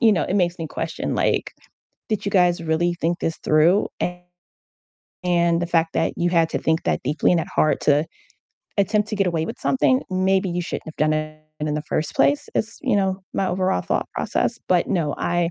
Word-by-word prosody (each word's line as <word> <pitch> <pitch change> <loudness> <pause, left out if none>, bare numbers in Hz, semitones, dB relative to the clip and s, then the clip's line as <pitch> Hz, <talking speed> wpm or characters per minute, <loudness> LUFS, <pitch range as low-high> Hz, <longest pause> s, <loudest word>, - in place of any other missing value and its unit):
you 225 -3 +5
know, 185 - +1
it 185 - -2
makes 180 -2 +1
me 165 - -4
question 160 +1 -4
like, - - 0 0.6
"Did 215 -2 -1
you 200 - -1
guys 180 -3 +3
really 170 +2 +1
think 170 +1 -1
this 165 - -2
through? 165 +6 +4 1.4
And 170 -1 +2
the - - -1
fact 165 -1 +1
that - - +1
you 175 0 +1
had 165 -2 +3
to - - -1
think 160 +1 0
that - - 0
deeply 145 +6 +1
and 175 - +3
that 165 - -2
hard 155 -1 +2
to 150 +1 +3 0.7
attempt 210 +2 +2
to 215 - -3
get 195 -2 +2
away 165 -2 -1
with - - -6
something, 260 0 +2
maybe 190 0 +1
you 175 +1 -1
shouldn't 175 - -5
have 160 - -9
done 155 0 +2
it 155 0 -3 0.2
in 150 0 -1
the 150 - -2
first 155 +1 -2
place," 140 +1 +2
is, 225 +1 -2
you 255 -7 +2
know, 190 -1 0
my 195 - 0
overall 185 - 0
thought - - -2
process. - - -1
But 180 -1 +2
no, 165 -7 0
I 175 -1 0
175 Hz, 210 wpm, -22 LUFS, 160-190 Hz, 1.4 s, you